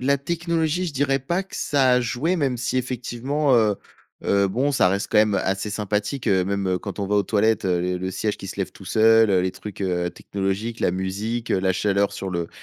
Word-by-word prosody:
la 140 +2 +2
technologie, 170 +2 -1
je 160 - -4
dirais 135 0 +1
pas 170 +8 -1
que 195 - -10
ça 135 -3 +2
a 125 - +4
joué, 130 +9 -1
même 135 -5 0
si 120 +2 -2
effectivement, 130 +3 0
heu 110 -3 +3 0.5
heu, 100 0 +3
bon, 130 +8 0
ça 90 - +4
reste 100 +2 -1
quand 105 - +4
même 105 -1 +4
assez 95 +2 -1
sympathique, 105 +5 -2
heu, 95 -2 +3
même 95 -1 -1
quand 100 +1 -7
on 100 - -1
va 105 - +2
aux 100 - +4
toilettes, 110 +2 +1
heu, 90 -2 +1
le 90 0 -1
le 95 +1 -3
siège 105 +2 -2
qui 95 - -9
se - - -7
lève - - -2
tout - - -14
seul, 110 -1 +5
heu, 95 -1 +4
les 95 - 0
trucs, 100 +1 -9
heu, 90 -2 -1
technologiques, 100 +6 -3
la - - +2
musique, 105 +6 -3
heu, - - +3
la 95 0 +2
chaleur 100 +1 +1
sur 95 -1 -5
le 85 -1 -2
105 Hz, 235 wpm, -23 LUFS, 95-130 Hz, 0.5 s, seul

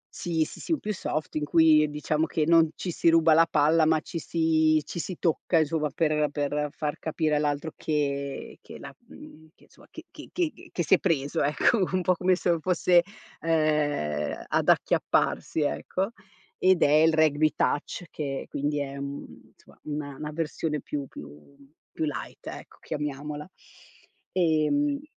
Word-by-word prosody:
Sì, 165 -2 0
sì, - - -11
sì, 335 - -2
in 310 - 0
più 215 - -3
soft 155 -5 -4
in 150 - -1
cui 155 -1 +5
diciamo 150 +2 -1
che 155 - 0
non 165 0 +5
ci 180 - -4
si 170 - +2
ruba 165 -1 +5
la 165 +1 +5
palla, 155 +1 +3
ma 160 0 +3
ci 165 +2 -6
si 160 -1 +2
ci - - -6
si 180 +1 -5
tocca 170 0 +1
insomma 155 -1 +1
per 150 0 +1
per 145 +1 -1
far 150 0 -4
capire 155 -1 0
all'altro 150 +1 -1
che 140 -2 -3
che - - -11
la - - -10
mhmm, 160 +1 -14
che - - -23
insomma - - -21
che - - -11
che - - -12
che 350 0 -3
che 175 - -1
si 165 - +2
è 190 - +6
preso 145 -6 0
ecco, 150 +10 +2
un 185 -1 +1
po' 185 - +3
come 180 +1 +2
se 175 -2 0
fosse, 175 +1 +3 0.4
ehm, 150 - 0
ad - - +1
acchiapparsi 160 - +1
ecco. 185 +7 -2 0.5
Ed 185 -1 +4
è 145 - +4
il 160 - +3
Rugby 155 -1 +3
Touch, 145 - -1
che 140 -3 -4
quindi 145 +1 -2
è, 140 0 -5
mhmm, 140 0 -8
somma, - - -22
una 145 -2 -5
una 150 +2 -6
versione 155 -1 -2
più 145 -2 -5
più 75 - -13 0.4
più 160 - -2
light, 150 - -6
ecco, - - -9
chiamiamola. 150 +1 -5 0.9
Ehm 190 - +1
155 Hz, 170 wpm, -26 LUFS, 145-165 Hz, 0.9 s, è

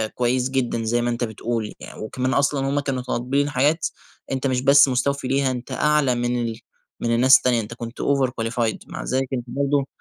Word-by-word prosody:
كويس 125 +1 +1
جدًا 125 -3 -1
زي 120 +2 +1
ما 120 - 0
أنت 120 0 -2
بتقول، 110 0 -3
يعني - - -11
وكمان 130 +4 -2
أصلًا 140 -1 +1
هُم 145 +1 +1
كانوا 135 -3 -2
طالبين 135 +4 -1
حاجات 150 +4 +1 0.4
أنت 135 +1 -1
مش 125 -1 0
بس 140 +1 +6
مستوفي 130 +1 0
ليها، 135 0 +1
أنت 125 -1 -6
أعلى 150 -4 +2
من 120 0 -1
ال 115 -1 -3 0.4
من 115 0 0
الناس 130 +3 +7
التانية، 120 -2 +1
أنت 110 +2 -8
كنت 115 0 -7
Overqualified 120 -4 0
مع - - -6
ذلك 130 +1 -1
أنت 125 -2 -2
برضو 140 +2 0
130 Hz, 190 wpm, -22 LUFS, 120-140 Hz, 0.4 s, الناس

